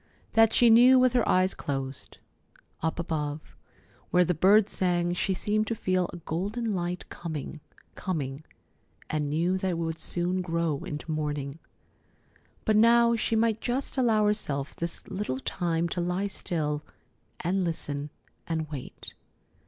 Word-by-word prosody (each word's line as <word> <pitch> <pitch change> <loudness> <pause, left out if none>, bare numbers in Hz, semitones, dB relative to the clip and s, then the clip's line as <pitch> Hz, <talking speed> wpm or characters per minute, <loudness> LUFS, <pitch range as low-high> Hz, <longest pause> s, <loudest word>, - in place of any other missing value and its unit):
That 225 0 +5
she 240 -2 +5
knew 250 +3 +8
with 255 -1 +4
her 245 -2 +2
eyes 185 +1 +3
closed. 135 -1 -5 0.6
Up 160 0 -1
above, 155 -3 -3 0.5
where 180 - +5
the 180 - +1
birds 195 +5 +5
sang, 175 -1 +1
she 190 +2 0
seemed 215 +3 0
to 230 - -1
feel 185 -3 0
a - - -8
golden 205 +8 -2
light 175 -1 -3
coming, 160 -2 -6 0.3
coming, 145 -6 -3 0.7
and 150 -2 -1
knew 170 +5 +1
that 190 - -1
it 175 - -1
would 165 -1 -3
soon 180 +1 -1
grow 165 -4 -1
into 150 +2 -6
morning. 150 -1 -3 1.1
But 215 -1 +3
now 235 +1 +6
she 225 0 0
might 225 0 +2
just 255 +3 -2
allow 225 -5 +3
herself 150 -10 -1
this 170 0 -5
little 190 -9 -3
time 170 +3 -1
to 175 - -2
lie 180 +3 -1
still 155 -6 -2 0.6
and 185 +3 0
listen 150 -4 -3 0.4
and 160 -2 -2
wait. 135 -4 -6
175 Hz, 145 wpm, -28 LUFS, 155-210 Hz, 1.1 s, knew